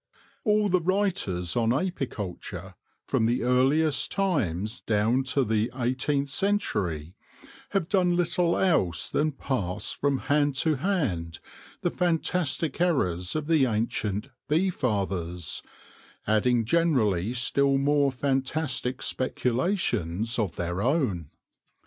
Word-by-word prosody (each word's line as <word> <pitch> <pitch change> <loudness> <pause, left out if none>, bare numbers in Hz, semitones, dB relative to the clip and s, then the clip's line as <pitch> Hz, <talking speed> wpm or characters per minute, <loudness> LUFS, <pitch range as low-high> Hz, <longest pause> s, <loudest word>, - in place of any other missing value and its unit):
All 210 -2 +3
the 185 -2 +2
writers 175 - 0
on 115 -1 +2
apiculture, 130 - -3 0.3
from 110 - +1
the 120 +2 0
earliest 135 +4 +2
times 110 - -1
down 115 +4 +1
to 135 +1 +1
the 110 0 +1
eighteenth 130 +3 0
century, 105 - -1 0.6
have 195 -5 0
done 180 -3 +2
little 175 0 +1
else 130 - +1
than 155 +1 +1
pass 105 -9 -2
from 140 -1 0
hand 145 -1 +1
to 155 +3 +1
hand 125 - -1 0.4
the 175 - 0
fantastic 170 -3 0
errors 90 - +1
of 155 -1 -1
the 155 -4 +3
ancient 105 0 -1
" - - -52
bee 175 +5 +2
fathers/' 95 - -2 0.6
adding 115 +2 +2
generally 115 - +2
still 140 +2 +2
more 140 0 +2
fantastic 135 0 -1
speculations 120 - -1
of 100 -7 -1
their 90 +2 -2
own. 115 - 0
130 Hz, 115 wpm, -27 LUFS, 105-160 Hz, 0.6 s, All